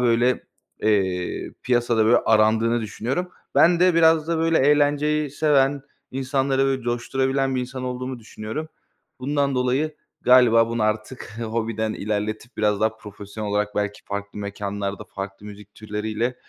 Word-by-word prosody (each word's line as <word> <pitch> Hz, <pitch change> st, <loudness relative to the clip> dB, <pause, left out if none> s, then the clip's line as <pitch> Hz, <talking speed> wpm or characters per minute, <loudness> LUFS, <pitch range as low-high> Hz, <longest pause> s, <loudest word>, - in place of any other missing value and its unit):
böyle, 120 Hz, +1 st, +2 dB, 0.4 s
eee, 95 Hz, -4 st, 0 dB
piyasada, 120 Hz, -3 st, +2 dB
böyle, 120 Hz, +2 st, +5 dB
arandığını 110 Hz, +2 st, +3 dB
düşünüyorum. 125 Hz, -, -3 dB, 0.3 s
Ben 175 Hz, 0 st, +5 dB
de 180 Hz, -2 st, +5 dB
biraz 160 Hz, -1 st, +4 dB
da, 165 Hz, -1 st, 0 dB
böyle, 165 Hz, 0 st, +2 dB
eğlenceyi 145 Hz, +1 st, +2 dB
seven, 140 Hz, -2 st, +2 dB, 0.3 s
insanları, 135 Hz, 0 st, 0 dB
böyle, 135 Hz, -2 st, 0 dB
coşturabilen 130 Hz, +3 st, 0 dB
bir 130 Hz, -, 0 dB
insan 130 Hz, +1 st, -5 dB
olduğumu 125 Hz, 0 st, -4 dB
düşünüyorum. 110 Hz, +7 st, -6 dB, 0.5 s
Bundan 140 Hz, 0 st, 0 dB
dolayı 130 Hz, +5 st, 0 dB, 0.3 s
galiba 120 Hz, -2 st, +6 dB
bunu 115 Hz, -1 st, -1 dB
artık 110 Hz, +1 st, -3 dB
hobiden 110 Hz, -1 st, -2 dB
ilerletip 110 Hz, +3 st, -3 dB
biraz 105 Hz, -1 st, +1 dB
daha 110 Hz, 0 st, +1 dB
profesyonel 105 Hz, 0 st, -7 dB
olarak 105 Hz, +1 st, -1 dB
belki 105 Hz, 0 st, -2 dB
farklı 100 Hz, 0 st, -6 dB
mekânlarda, 100 Hz, 0 st, -4 dB
farklı 100 Hz, +1 st, -8 dB
müzik 105 Hz, 0 st, -12 dB
türleriyle, 110 Hz, +3 st, -3 dB
120 Hz, 135 wpm, -23 LUFS, 105-135 Hz, 0.5 s, galiba